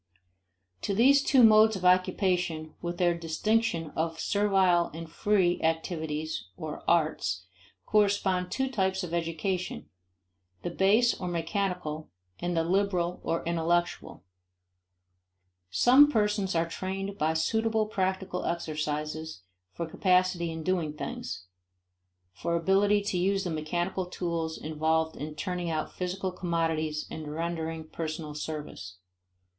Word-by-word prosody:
To 200 - -1
these 275 +6 +6
two 270 -2 +5
modes 220 0 +7
of 185 -1 -4
occupation, 180 -3 +2
with 175 0 -4
their 175 -1 +3
distinction 170 +1 0
of 165 0 -2
servile 190 -4 +3
and 165 0 -6
free 180 +1 +1
activities 160 - -2
(or 155 -1 -6
"arts") 150 - +1 0.4
correspond 200 -3 +2
two 265 +6 -1
types 190 -6 0
of 170 -2 -5
education: 170 +2 -2 0.7
the 175 - -2
base 210 +7 +4
or 180 - -5
mechanical 175 -2 -2 0.3
and 175 -1 -2
the 165 - +3
liberal 180 -1 0
or 165 - -1
intellectual. 170 - -1 1.5
Some 260 - +6
persons 210 -5 +1
are 165 0 +2
trained 195 +3 -4
by 160 +1 +1
suitable 220 +6 +1
practical 190 -2 -2
exercises 155 - -3 0.3
for 170 - -4
capacity 180 0 +2
in 160 0 -5
doing 170 -4 0
things, 90 -10 -6 0.9
for 170 - -2
ability 200 +4 +3
to 190 -3 -1
use 195 +2 +1
the 180 - -3
mechanical 175 +4 -2
tools 170 -3 -3
involved 160 +1 0
in 150 +1 -6
turning 180 0 -3
out 155 -1 -2
physical 185 +1 -3
commodities 165 -3 -1
and 155 -2 -6
rendering 165 0 -3
personal 155 -1 -5
service. 150 - -6
175 Hz, 120 wpm, -29 LUFS, 160-190 Hz, 1.5 s, modes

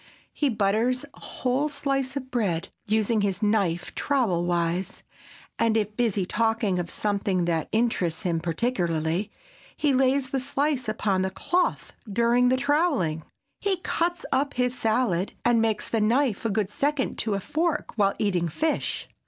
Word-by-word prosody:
He 290 - +1
butters 225 +4 +1
a - - -17
whole 265 +4 0
slice 275 -2 -1
of 260 -2 -5
bread, 190 -7 -1 0.2
using 215 +1 +2
his 200 0 -1
knife 195 -5 +1
trowel 215 -12 +1
wise, 175 +1 -1 0.6
and 225 -1 +3
if 210 -1 -1
busy 215 -6 +1
talking 225 -2 +1
of 170 -1 -3
something 200 -3 0
that 165 -2 -1
interests 215 -6 0
him 170 -3 0
particularly, 170 -1 -1 0.5
he 295 -3 +2
lays 265 +1 +2
the 270 - 0
slice 275 -2 0
upon 205 -3 0
the 190 - 0
cloth 350 - -1 0.2
during 235 +3 +3
the 260 - +3
troweling. 275 - +1 0.4
He 395 -2 +1
cuts 345 0 -1
up 280 +1 +1
his 250 0 +1
salad, 220 -6 0
and 240 -1 +4
makes 220 -2 0
the 225 - 0
knife 235 0 +1
a - - +2
good 210 -1 -1
second 285 +3 -1
to 215 -2 0
a - - -1
fork 315 - -1
while 200 -3 +2
eating 180 -5 +1
fish. 310 - -1
220 Hz, 155 wpm, -26 LUFS, 190-260 Hz, 0.6 s, and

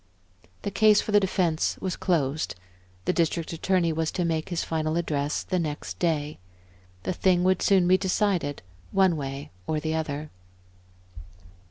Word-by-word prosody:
The 200 - -2
case 215 0 +5
for - - -2
the 205 - +6
defense 180 -4 0
was 185 -2 -2
closed, 155 - 0 0.5
the - - +2
District 165 -1 0
Attorney 170 0 +1
was 160 0 0
to 180 - 0
make 160 0 -1
his 175 -2 -1
final 155 0 -1
address 150 -3 -1
the 185 - -1
next 145 - -4
day. 150 -3 -1 0.6
The - - -1
thing 180 0 +2
would 185 0 +2
soon 190 -3 +4
be 185 +1 +5
decided, 185 - 0 0.3
one 190 -3 +4
way 140 -1 -5 0.2
or 155 - 0
the 155 +1 -2
other. 155 -1 -3
165 Hz, 155 wpm, -26 LUFS, 155-185 Hz, 0.6 s, the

